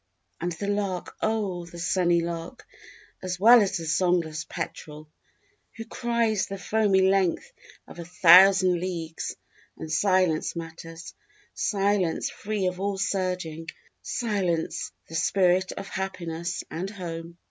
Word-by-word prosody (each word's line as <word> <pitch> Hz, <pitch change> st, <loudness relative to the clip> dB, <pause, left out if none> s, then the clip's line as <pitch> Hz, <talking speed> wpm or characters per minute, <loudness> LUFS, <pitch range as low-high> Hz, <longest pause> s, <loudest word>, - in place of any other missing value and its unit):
_ -, -, -5 dB
_And 175 Hz, -2 st, -4 dB
the 200 Hz, -, -4 dB
lark 200 Hz, -3 st, -2 dB
oh 200 Hz, -6 st, -1 dB
the 170 Hz, -, -11 dB
sunny 175 Hz, 0 st, +2 dB
lark 170 Hz, +6 st, -6 dB, 0.6 s
as 185 Hz, -1 st, -4 dB
well 235 Hz, +4 st, +8 dB
as 195 Hz, -1 st, 0 dB
the 165 Hz, -, -6 dB
songless 160 Hz, -2 st, 0 dB
petrel, 150 Hz, 0 st, -6 dB, 0.7 s
Who 225 Hz, -, -6 dB
cries 235 Hz, -4 st, 0 dB
the 195 Hz, -, -5 dB
foamy 195 Hz, +1 st, +2 dB
length 190 Hz, -, +1 dB, 0.3 s
of -, -, -12 dB
a 170 Hz, -, -6 dB
thousand 185 Hz, +1 st, +6 dB
leagues. 165 Hz, -3 st, -4 dB, 0.4 s
And 155 Hz, -, -7 dB
silence 185 Hz, -2 st, +2 dB
matters, 165 Hz, 0 st, -8 dB, 0.4 s
silence 200 Hz, -4 st, 0 dB
free 210 Hz, -2 st, -3 dB
of 180 Hz, 0 st, -2 dB
all 200 Hz, 0 st, -1 dB
surging, 180 Hz, -4 st, -2 dB, 0.3 s
Silence, 195 Hz, -8 st, -2 dB, 0.2 s
the -, -, -13 dB
spirit 180 Hz, +2 st, +2 dB
of 195 Hz, -, -7 dB
happiness 175 Hz, -3 st, -4 dB
and 180 Hz, +4 st, -4 dB
home. 170 Hz, -4 st, -7 dB
185 Hz, 130 wpm, -26 LUFS, 170-195 Hz, 0.7 s, well